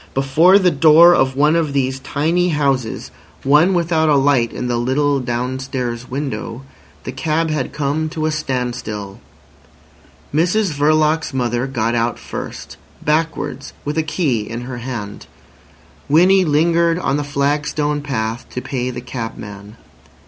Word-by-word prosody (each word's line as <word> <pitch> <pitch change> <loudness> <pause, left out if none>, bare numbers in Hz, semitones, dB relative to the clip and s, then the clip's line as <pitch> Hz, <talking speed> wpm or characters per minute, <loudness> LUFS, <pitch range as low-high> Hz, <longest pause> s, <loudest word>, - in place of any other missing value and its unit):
Before 155 +8 +5
the 185 -3 +3
door 160 +4 +7
of 130 -4 +2
one 150 +3 +3
of 160 -4 0
these 130 -1 0
tiny 160 +6 0
houses—one 145 +3 0
without 165 -2 +1
a 150 - +4
light 135 -4 +2
in - - -5
the 120 -1 0
little 140 +3 +1
downstairs 125 0 -3
window—the 130 -1 -7
cab 155 +4 -1
had 145 -4 -2
come 150 +2 -1
to 155 0 -3
a 155 - +1
standstill. 125 -8 -4 1.1
Mrs 180 +5 +2
Verloc's 155 +1 +1
mother 120 0 -1
got 115 -3 -1
out 120 0 0
first, - - -8 0.3
backwards, 150 -3 -2
with 145 +1 -2
a 160 - +2
key 155 - -1
in 115 +1 -5
her 125 0 -6
hand. 115 -5 -6 0.8
Winnie 185 +5 +5
lingered 165 +2 +2
on 160 -5 0
the 145 - -2
flagstone 145 +1 -1
path 115 -5 -3
to - - -5
pay 125 -1 -3
the 125 -1 -6
cabman. 110 -4 -8
140 Hz, 135 wpm, -18 LUFS, 125-155 Hz, 1.1 s, door